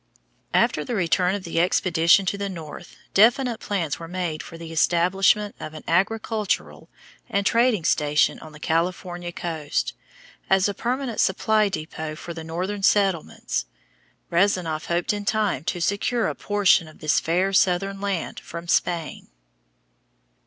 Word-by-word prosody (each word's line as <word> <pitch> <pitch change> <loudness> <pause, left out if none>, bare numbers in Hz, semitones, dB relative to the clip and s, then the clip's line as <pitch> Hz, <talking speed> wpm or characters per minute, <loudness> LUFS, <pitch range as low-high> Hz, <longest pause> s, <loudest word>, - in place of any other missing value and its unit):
After - - +2
the 245 - -3
return 180 0 +2
of 200 - -5
the 165 -1 -2
expedition 175 +1 +3
to 190 - 0
the 200 0 -3
north, 165 -5 -9 0.2
definite 235 +3 +4
plans 175 -10 -2
were 165 - -7
made 175 -3 -3
for 165 - -10
the 165 -1 -9
establishment 185 +5 +2
of 155 - -7
an 155 - -9
agricultural 215 +4 -1 0.4
and 200 0 0
trading 230 -4 +3
station 150 0 +2
on 155 - -11
the 150 - -13
California 175 +2 -2
coast, 160 -4 -3 0.6
as 190 0 +4
a 205 - -2
permanent 245 +2 -3
supply 215 +2 +2
depot 155 -3 -5
for 170 +2 -7
the 165 -1 -7
northern 185 +5 -3
settlements. 190 - +1 0.6
Rezanof 175 -3 +1
hoped 175 +3 0
in 205 0 -4
time 205 - 0
to 175 - -2
secure 200 +6 0
a - - -2
portion 200 -5 +2
of 155 - -14
this 155 -1 +2
fair 185 +4 0
southern 195 +1 +2
land 200 -4 -2
from 170 +1 -8
Spain. 165 -1 -1
180 Hz, 145 wpm, -24 LUFS, 165-200 Hz, 0.6 s, definite